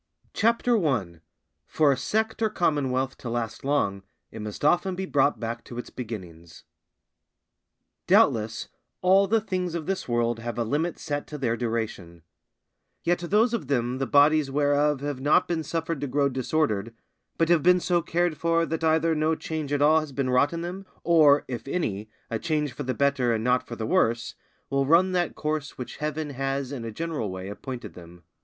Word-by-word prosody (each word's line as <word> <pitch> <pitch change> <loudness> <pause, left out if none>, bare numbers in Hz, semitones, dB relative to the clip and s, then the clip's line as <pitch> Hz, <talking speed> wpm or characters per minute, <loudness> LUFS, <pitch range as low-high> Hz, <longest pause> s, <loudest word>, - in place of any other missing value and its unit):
CHAPTER 230 -1 +2
I.—For 120 - -1
a - - +2
Sect 220 - -1
or 220 - +3
Commonwealth 135 -8 0
to 120 - -6
last 115 -1 -3
long, 135 -9 0 0.3
it 110 - -8
must 105 +6 -5
often 175 +4 +2
be 190 +1 -3
brought 145 -4 +2
back 115 0 -4
to 120 - -9
its 120 - -6
Beginnings. 90 -9 -8 1.4
Doubtless, 110 0 +3 0.3
all 190 +2 +5
the 225 +3 +3
things 185 -5 -3
of 165 -3 -3
this 195 +2 -3
world 120 -1 +1
have 120 +1 -5
a 120 - +1
limit 150 +8 -1
set 145 -1 -4
to 150 - -7
their 120 -5 0
duration; 110 -8 -4 0.8
yet 175 +1 +1
those 210 +7 +2
of 175 - -2
them 125 -1 0
the 135 - -1
bodies 145 0 +4
whereof 145 0 +2
have 145 -2 -3
not 150 +6 +3
been 170 -2 -1
suffered 165 -1 -3
to 145 - -2
grow 140 +2 +1
disordered, 125 -5 -1 0.4
but 165 0 +2
have 170 -2 +4
been 180 +2 +5
so 175 -1 +1
cared 170 -1 0
for 165 +1 +2
that 165 0 -3
either 160 +1 +3
no 155 +1 +1
change 155 -3 -5
at 145 0 +2
all 155 +2 +6
has 155 -2 -6
been 135 -1 -1
wrought 125 +3 +3
in 170 0 -4
them, 180 +3 -5 0.2
or, 155 -4 +5
if 120 -1 -6
any, 110 - -2 0.2
a 115 - -1
change 150 -4 -1
for 135 - -7
the 130 -2 -2
better 140 -3 +2
and 110 - -2
not 125 +1 +1
for 120 - -6
the 110 - -4
worse, 115 +1 +1 0.4
will 140 0 +1
run 175 +5 +5
that 175 -3 0
course 150 -1 -3
which 125 - -7
Heaven 150 0 -3
has 135 0 -2
in 130 -5 -5
a 115 - -4
general 155 -4 -3
way 95 +1 -6
appointed 120 +4 -7
them. 85 0 -14
145 Hz, 190 wpm, -26 LUFS, 120-165 Hz, 1.4 s, all